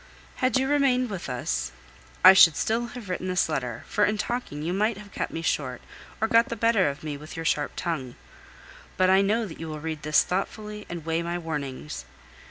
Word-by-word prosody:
Had 255 -3 +2
you 265 +1 +1
remained 265 -4 +2
with 190 -1 -5
us, 65 - -2 0.5
I 185 - +12
should 170 -5 +8
still 235 +2 0
have 230 -5 -8
written 185 0 -3
this 185 0 +2
letter, 125 -7 -3
for 210 - +1
in 210 +1 +2
talking 210 -9 -3
you 170 +3 -1
might 210 +2 +1
have 205 -2 -12
cut - - -2
me 165 - -5
short 130 -6 -1 0.4
or 220 - +1
got 230 +1 +4
the 235 - -3
better 225 -6 +3
of 140 +2 -7
me 150 -2 -4
with 150 +4 -10
your 165 -1 -5
sharp 145 -2 0
tongue. 135 -8 -3 0.8
But 185 0 +4
I 190 +1 +6
know 215 +3 +1
that 170 - -9
you 165 - -5
will 155 -1 -5
read 160 0 -4
this 155 -2 +4
thoughtfully 210 +3 -4
and 170 -2 -6
weigh 165 +1 0
my 170 +1 -2
warnings. 140 - -5
180 Hz, 210 wpm, -26 LUFS, 150-215 Hz, 0.8 s, I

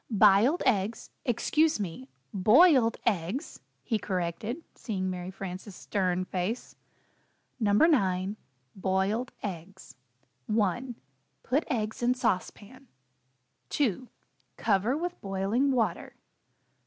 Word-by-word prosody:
"B'iled 215 - +5
eggs 220 -2 0
excuse 300 +4 +2
me! 165 -9 -5 0.2
boiled 235 - +5
eggs," 205 - -1 0.2
he 225 -3 0
corrected, 190 - -3
seeing 190 -5 -3
Mary 180 0 -5
Frances' 190 +1 -7
stern 185 -2 -1
face. 185 +6 -3 0.8
NO. 210 -3 +2
9. 200 - +3 0.4
BOILED 195 +6 0
EGGS. 185 -6 -7 0.5
1. 220 +4 0 0.5
Put 280 +6 +1
eggs 220 -5 -2
in 245 +1 +2
sauce 190 -7 +1
pan. 255 +6 -16 0.8
2. 255 -3 0 0.5
Cover 220 +5 +1
with 350 +2 -4
boiling 195 +7 0
Water. 245 -4 -1
210 Hz, 100 wpm, -29 LUFS, 190-250 Hz, 0.8 s, B'iled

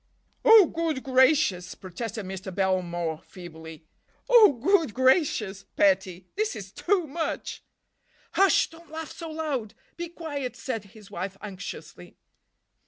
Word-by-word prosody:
"Oh, 450 -4 +9
good 320 -4 -2
gracious!" 260 - +3
protested 215 +3 -6
Mr. 190 +1 -6
Belmore 175 -4 -1
feebly. 160 -3 -11 0.4
"Oh, 450 -9 +7
good 310 - +2
gracious, 255 - +2
petty! 190 -2 +2
This 430 - -1
is 195 -3 -8
too 365 - 0
much." 320 +3 -4 0.7
"Hush—don't 340 -3 +2
laugh 320 0 -6
so 330 -1 -8
loud—be 310 +1 -5
quiet," 290 -8 -5
said 225 -4 -4
his 210 0 -16
wife 195 +1 -5
anxiously. 200 -2 -9
235 Hz, 110 wpm, -26 LUFS, -, 0.7 s, Oh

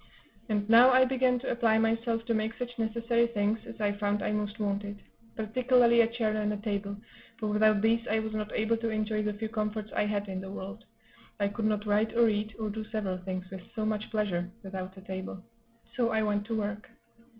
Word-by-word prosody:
And 205 -1 0
now 235 +3 +8
I 260 0 +6
began 255 -1 +2
to 250 - -3
apply 230 -2 +3
myself 225 +1 +1
to 230 - 0
make 220 +1 -1
such 245 0 -5
necessary 230 +1 +1
things 215 -1 0
as 230 -1 -9
I 205 -1 +2
found 205 0 -1
I - - 0
most 210 +1 -2
wanted, 205 0 -2 0.4
particularly 235 +1 +4
a 225 - +3
chair 225 -2 -1
and 210 -1 0
a 210 - -2
table; 200 -1 -3 0.4
for 215 -1 -2
without 210 0 +4
these 230 +1 +2
I 220 - +2
was 220 0 -2
not 215 0 -3
able 225 +1 +1
to 230 0 -2
enjoy 215 0 0
the 210 0 -1
few 220 +1 -3
comforts 215 -1 -3
I 210 - +2
had 205 -1 -1
in 190 -1 -4
the 190 - -7
world 200 +3 -7 0.5
I 200 0 +2
could 215 +2 -3
not 210 -1 +1
write 210 +2 +1
or 235 -1 +6
eat, 210 0 -2
or 215 -2 -2
do 220 +1 -4
several 200 -5 -2
things, 185 0 -4
with 190 -1 -6
so 215 -2 -1
much 215 0 -2
pleasure 185 -5 -1
without 190 0 -6
a - - -10
table; 190 0 -6 0.5
so 235 -2 +2
I 220 -1 +1
went 205 -1 0
to 225 - -1
work. 210 0 -3
215 Hz, 215 wpm, -30 LUFS, 205-230 Hz, 0.5 s, now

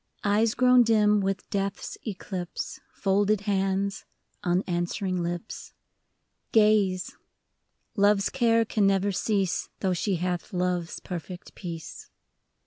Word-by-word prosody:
Eyes 215 +2 +2
grown 250 0 +6
dim 210 -2 +4
with 195 -1 -2
Death's 195 0 -2
eclipse. 185 -3 -5
Folded 205 +1 +1
hands, 195 -1 0 0.4
unanswering 180 0 -1
lips 175 0 -5 0.4
— - - -50
Gaze, 210 -4 +3 0.4
— - - -50
Love's 200 -1 +3
care 230 -3 +3
can 210 -2 +2
never 195 +1 +2
cease, 195 -2 0
Though 190 -2 +1
she 190 +2 0
hath 180 +3 -3
Love's 180 -2 -1
perfect 180 0 -7
peace. 170 -3 -8
195 Hz, 115 wpm, -27 LUFS, 180-210 Hz, 0.4 s, grown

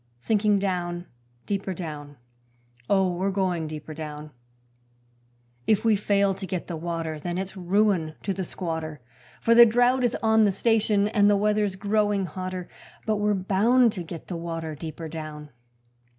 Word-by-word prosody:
Sinking 210 - +2
down, 175 -3 -2 0.4
deeper 195 -2 -2
down, 145 -4 -7 0.7
Oh, 190 -2 +3
we're 185 +3 -1
going 185 -4 -1
deeper 155 0 -7
down: 150 -1 -7 1.4
If 215 0 +2
we 220 -2 +5
fail 200 -1 +2
to 190 0 -6
get 180 -1 -3
the 170 - -5
water 165 -1 -4
then 175 +3 -3
it's 190 +1 -4
ruin 185 -3 +1
to 195 - -1
the 190 0 -3
squatter, 160 -4 -4 0.4
For 230 - +4
the 235 +1 +10
drought 245 +3 +3
is 240 -1 +1
on 220 0 +5
the 200 - +3
station 210 0 +2
and 205 -1 +3
the 205 - +4
weather's 210 -1 +1
growing 205 0 +1
hotter, 185 +1 -5 0.4
But 215 -1 +1
we're 210 0 +1
bound 215 +5 +3
to 180 - -5
get 165 -1 -8
the 175 - -5
water 165 -1 -4
deeper 160 +2 -7
down. 155 -2 -7
190 Hz, 160 wpm, -26 LUFS, 165-210 Hz, 1.4 s, the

